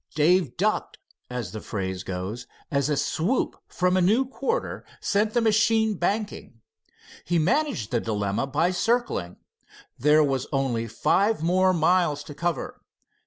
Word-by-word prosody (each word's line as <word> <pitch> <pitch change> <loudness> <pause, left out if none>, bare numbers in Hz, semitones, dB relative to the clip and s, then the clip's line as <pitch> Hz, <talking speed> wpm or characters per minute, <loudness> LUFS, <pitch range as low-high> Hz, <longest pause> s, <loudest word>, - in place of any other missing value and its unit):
Dave 160 -2 +3
"ducked," 210 +4 0 0.3
as 125 -3 -4
the 110 - -6
phrase 95 -2 -4
goes, 95 +6 -5 0.2
as 140 0 +1
a 150 - +1
swoop 185 - 0
from 180 0 +1
a 185 - +3
new 220 +9 +3
quarter 460 - -3 0.2
sent 210 +2 0
the 240 - +4
machine 220 0 +3
banking. 200 - -3 0.6
He 175 +2 0
managed 245 - 0
the 120 - +2
dilemma 105 +2 -1
by 155 +6 +1
circling. 185 - 0 0.6
There 150 +3 +5
was 135 -3 -1
only 130 -5 0
five 185 - +1
more 185 +2 +3
miles 170 -3 +2
to 145 - -9
cover. 170 +2 -3
165 Hz, 140 wpm, -25 LUFS, 125-205 Hz, 0.6 s, There